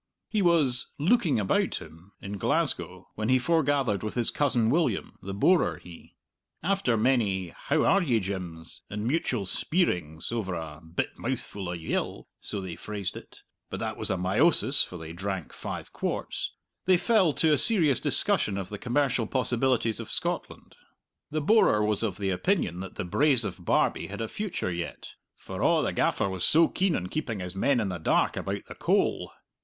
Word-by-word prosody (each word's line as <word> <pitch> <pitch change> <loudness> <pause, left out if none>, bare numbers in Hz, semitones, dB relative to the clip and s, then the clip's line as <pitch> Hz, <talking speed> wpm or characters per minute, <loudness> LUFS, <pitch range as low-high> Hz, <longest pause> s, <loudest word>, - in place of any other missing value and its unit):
He 215 - +1
was 155 -9 +2
"looking 165 - +3
about 100 - +1
him" 85 +5 -10
in 100 0 -6
Glasgow - - 0
when 110 +2 -2
he 130 - +5
forgathered 140 - +1
with 110 - -4
his 120 -2 +2
cousin 120 -6 +2
William 150 - 0
the 95 - -6
borer 175 - +3
he! 85 -2 -14 0.5
After 185 - +1
many 105 -7 +1
"How - - 0
are 195 - +4
ye, 125 -10 +2
Jims's" 90 -4 -6
and 105 +1 -4
mutual 125 -6 0
speirings 90 - -1
over 105 -6 -2
a 80 -2 -7
"bit 80 +1 -4
mouthful 115 -7 -4
of 90 - -5
yill" 80 - -3
so 100 - -5
they 95 -3 -6
phrased 100 -3 -5
it; - - -12 0.3
but - - -5
that - - -3
was - - -3
a - - +1
meiosis, 130 - +3
for 90 - -7
they 80 -1 -8
drank 95 -1 -4
five - - -6
quarts - - -3 0.3
they 185 -1 +5
fell 200 -4 +3
to 160 +1 +3
a - - +4
serious 165 - +3
discussion 100 -2 +1
of 95 -2 -4
the 105 - -6
commercial 125 -2 +1
possibilities 125 -3 +1
of - - -7
Scotland. - - -3 0.5
The 155 +1 -1
borer 170 - +4
was 105 -1 0
of 105 -5 -1
the 100 -1 -1
opinion 90 - 0
that 95 0 -7
the - - -3
Braes 130 - +3
of 95 -3 -6
Barbie - - +2
had - - -7
a 115 - -2
future 195 - -3
yet, 85 0 -5 0.2
"for - - -7
a' - - +3
the - - -1
gaffer - - +1
was 95 -2 -3
so 165 +1 +5
keen 185 -3 +1
on 90 - -2
keeping 115 0 -3
his 90 0 -5
men 125 +6 +2
in 105 -4 -1
the 90 -2 -4
dark 80 - +2
about - - -4
the - - -9
coal." - - 0
110 Hz, 180 wpm, -28 LUFS, 95-145 Hz, 0.5 s, he